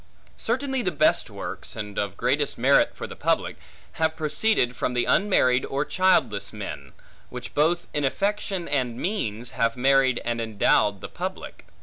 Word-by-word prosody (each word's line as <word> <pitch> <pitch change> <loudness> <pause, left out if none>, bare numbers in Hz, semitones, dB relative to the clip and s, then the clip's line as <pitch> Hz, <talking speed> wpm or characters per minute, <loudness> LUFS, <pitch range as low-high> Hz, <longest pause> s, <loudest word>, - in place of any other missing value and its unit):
Certainly 265 +2 -1
the 185 - -1
best 155 -1 +2
works, - - -7
and 105 -1 -5
of 100 -1 -3
greatest 140 +2 +1
merit 135 +4 +3
for - - -6
the - - -9
public, - - 0 0.4
have 160 0 0
proceeded 155 - +1
from 125 - -2
the 120 - +1
unmarried 130 -11 +3
or 140 +2 -2
childless 150 - +2
men; 70 -2 -7 0.4
which - - -8
both 165 +4 +2
in 145 - -1
affection 195 +4 -1
and 130 -5 -1
means, 120 - -3
have 115 +1 0
married 135 -1 +3
and 120 0 -1
endowed 105 -2 +2
the - - -5
public. - - -7
135 Hz, 155 wpm, -25 LUFS, 115-175 Hz, 0.4 s, merit